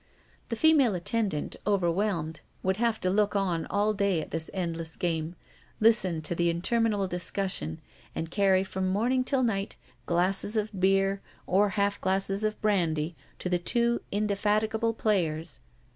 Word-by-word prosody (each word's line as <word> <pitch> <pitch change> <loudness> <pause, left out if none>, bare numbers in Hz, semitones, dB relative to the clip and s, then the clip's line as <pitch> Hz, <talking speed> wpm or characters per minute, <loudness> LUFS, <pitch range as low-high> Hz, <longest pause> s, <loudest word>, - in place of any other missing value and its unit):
The 230 - -1
female 275 -5 +4
attendant, 190 -3 -2
overwhelmed, 175 -4 0 0.2
would 190 0 +1
have 230 -1 +1
to 185 - +1
look 205 +1 +2
on 180 -5 0
all 210 +1 +1
day 200 -4 +1
at - - -6
this 160 0 -2
endless 165 -3 -4
game, 165 -1 -2 0.4
listen 190 -8 +3
to 155 - -2
the 170 0 +1
interminable 205 +3 +1
discussion, 180 - -2 0.4
and 160 0 -4
carry 190 -2 +3
from 190 -1 -3
morning 240 +7 +1
till 260 0 +1
night 200 -4 -1 0.3
glasses 185 +5 +1
of 215 0 0
beer 195 +1 +2 0.2
or 200 +3 +3
half 200 0 +1
glasses 195 +2 0
of 215 0 -1
brandy 170 -6 +1 0.2
to - - -4
the 180 -1 +1
two 235 +6 +1
indefatigable 215 +2 0
players. 165 -8 -1
195 Hz, 145 wpm, -28 LUFS, 175-215 Hz, 0.4 s, female